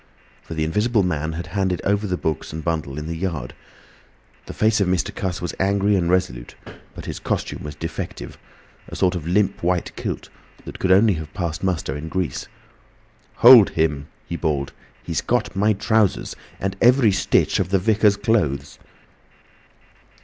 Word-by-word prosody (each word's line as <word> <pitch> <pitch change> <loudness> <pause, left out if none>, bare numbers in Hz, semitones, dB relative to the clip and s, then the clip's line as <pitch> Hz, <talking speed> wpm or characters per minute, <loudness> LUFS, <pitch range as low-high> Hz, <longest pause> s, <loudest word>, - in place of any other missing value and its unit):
For 80 - -8
the 80 - -1
Invisible 105 +7 +1
Man 80 -3 -2
had 85 +2 -5
handed 95 -3 -1
over 100 +1 0
the 90 -1 -1
books 80 -3 -3
and 80 +1 -6
bundle 80 -4 -2
in 75 - -5
the 85 +1 -4
yard. 85 -2 -4 0.9
The - - -7
face 110 -1 +2
of 100 - +2
Mr. 90 -1 0
Cuss 95 -1 -4
was 85 - -3
angry 100 +1 +2
and 85 -3 +1
resolute, 60 -10 -1 0.4
but - - -9
his - - -5
costume - - -3
was 75 -1 -7
defective, 80 +2 -6 0.5
a - - -8
sort 90 -1 +2
of 85 -3 -5
limp 100 +2 +1
white 90 0 -1
kilt - - -5 0.4
that - - -9
could 95 - +1
only 100 +3 +5
have 80 -3 -6
passed 85 -3 -3
muster 85 -8 -1
in 75 +2 -6
Greece. 95 0 -3 0.9
"Hold 120 -4 +9
him!" 75 -3 -1 0.2
he 85 - -4
bawled. 75 -5 -2 0.3
"He's - - -2
got - - -1
my 105 +3 +3
trousers! 110 0 +1 0.2
And 95 0 -2
every 120 -2 +5
stitch 95 - +1
of 95 -2 -1
the 95 - +3
Vicar's 105 +1 +3
clothes!" 100 -11 -1
90 Hz, 170 wpm, -22 LUFS, 80-100 Hz, 0.9 s, Hold